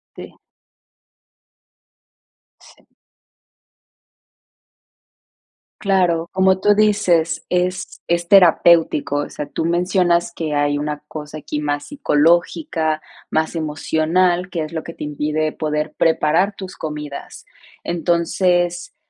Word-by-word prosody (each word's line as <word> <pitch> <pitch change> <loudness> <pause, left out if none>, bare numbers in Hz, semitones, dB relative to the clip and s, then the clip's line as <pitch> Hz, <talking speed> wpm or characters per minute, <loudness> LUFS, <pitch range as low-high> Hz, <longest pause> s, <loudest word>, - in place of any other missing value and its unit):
Sí. - - -11 2.2
Sí. - - -21 2.9
Claro, 180 -4 +1
como 190 0 +3
tú 205 +1 +4
dices, 180 -6 +2
es 180 +1 -2
es 170 0 0
terapéutico, 170 -6 +4
o 145 - -2
sea, 150 - -6
tú - - -4
mencionas 175 0 +1
que 155 -3 -3
hay 145 0 +1
una 150 0 -4
cosa 150 0 -8
aquí 150 0 -5
más 145 -1 -2
psicológica, 165 - +1 0.3
más 160 +1 -1
emocional, 165 +3 0
que 165 -4 -3
es 155 +2 -8
lo 160 - -3
que 165 - -9
te - - -7
impide 150 +1 -2
poder 150 -1 -3
preparar 165 +5 +2
tus 190 -2 -8
comidas. 150 -2 -7 0.4
Entonces, 175 +1 0
165 Hz, 105 wpm, -19 LUFS, 155-180 Hz, 2.9 s, tú